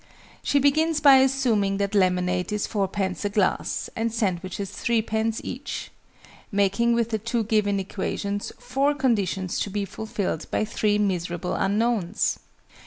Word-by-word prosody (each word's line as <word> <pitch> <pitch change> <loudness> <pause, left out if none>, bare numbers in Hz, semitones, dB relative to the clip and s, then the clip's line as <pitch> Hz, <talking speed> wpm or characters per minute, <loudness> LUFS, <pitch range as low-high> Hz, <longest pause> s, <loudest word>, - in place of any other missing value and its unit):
She 285 - +1
begins 305 +3 +3
by 280 -2 +8
assuming 250 -7 +2
that 200 +1 -1
lemonade 180 -2 +1
is 210 0 -1
4_d._ 195 -2 -2
a 205 - 0
glass, 200 -2 0
and 230 0 -1
sandwiches 195 -2 -2
3_d._ 220 -1 0
each, - - -5 0.6
(making 205 +4 +2
with 235 0 0
the 220 - 0
2 230 +2 -1
given 205 -2 +1
equations, 200 +1 -3
four 275 +3 0
conditions 200 - 0
to - - -1
be 200 0 -2
fulfilled 200 -6 -4
by - - 0
three 210 -1 +1
miserable 180 -3 -1
unknowns!). 210 -1 0
210 Hz, 135 wpm, -25 LUFS, 195-235 Hz, 0.6 s, by